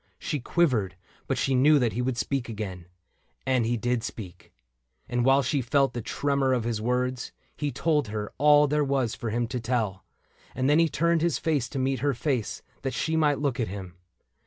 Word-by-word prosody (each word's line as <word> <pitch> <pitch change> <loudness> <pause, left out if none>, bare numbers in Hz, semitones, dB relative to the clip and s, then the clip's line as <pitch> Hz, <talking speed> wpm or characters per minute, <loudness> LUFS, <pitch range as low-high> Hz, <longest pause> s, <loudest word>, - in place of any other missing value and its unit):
She 150 - -3
quivered, 120 - +1 0.3
but - - 0
she 135 - +1
knew 145 +4 +5
that 120 -5 +1
he 125 - -1
would 125 -1 -1
speak 135 -1 -2
Again 95 -5 -6 0.3
— - - -43
and 125 -3 +2
he 120 +1 0
did 120 +1 0
speak. 90 -7 -8 0.6
And 120 -1 0
while 135 +2 +4
she 135 +2 0
felt 135 +3 +2
the 120 - -3
tremor 140 +2 0
of 125 -3 0
his 115 -2 -2
words, 125 +2 -1 0.2
He 145 -1 -2
told 150 -5 +1
her 105 0 -5
all 150 0 +6
there 150 +1 +1
was 135 -5 0
for 115 - -4
him 120 +2 0
to 125 - -2
tell; 110 -6 -1 0.5
And 130 - 0
then 150 +3 +4
he 165 -1 +4
turned 170 +2 +1
his 170 -2 +1
face 145 -7 0
to 140 - -5
meet 130 0 0
her 140 0 0
face, 125 -3 -2 0.2
That 135 -1 -3
she 160 +1 -1
might 150 -3 +3
look 140 -4 -1
at 115 - 0
him. 95 -2 -7
130 Hz, 205 wpm, -27 LUFS, 115-145 Hz, 0.6 s, all